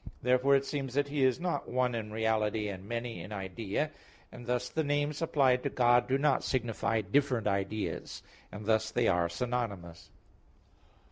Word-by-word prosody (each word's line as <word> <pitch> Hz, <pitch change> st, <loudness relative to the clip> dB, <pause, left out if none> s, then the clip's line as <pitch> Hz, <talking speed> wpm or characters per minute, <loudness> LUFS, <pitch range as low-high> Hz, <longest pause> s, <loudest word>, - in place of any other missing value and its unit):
Therefore 130 Hz, +3 st, +4 dB
it 135 Hz, 0 st, +2 dB
seems 135 Hz, -3 st, -4 dB
that 145 Hz, 0 st, +1 dB
He 145 Hz, -1 st, 0 dB
is 130 Hz, +3 st, +3 dB
not 175 Hz, 0 st, -2 dB
one 125 Hz, 0 st, +1 dB
in 110 Hz, -2 st, -4 dB
reality 110 Hz, -1 st, 0 dB
and 95 Hz, 0 st, -8 dB
many 120 Hz, 0 st, -4 dB
in 95 Hz, -, -9 dB
idea; 100 Hz, +8 st, -3 dB, 0.4 s
and 120 Hz, -, -11 dB
thus 125 Hz, 0 st, 0 dB
the 160 Hz, +5 st, -1 dB
names 145 Hz, +1 st, 0 dB
applied 135 Hz, -6 st, +3 dB
to -, -, -1 dB
God 120 Hz, -1 st, +3 dB
do 130 Hz, -, +2 dB
not 140 Hz, -1 st, +2 dB
signify 115 Hz, -3 st, 0 dB
different 125 Hz, +2 st, +1 dB
ideas; 100 Hz, +1 st, -2 dB, 0.3 s
and 105 Hz, 0 st, -8 dB
thus 110 Hz, 0 st, +2 dB
they 120 Hz, +1 st, +1 dB
are 85 Hz, -2 st, +2 dB
synonymous. 100 Hz, -6 st, -4 dB
120 Hz, 165 wpm, -31 LUFS, 105-135 Hz, 0.4 s, Therefore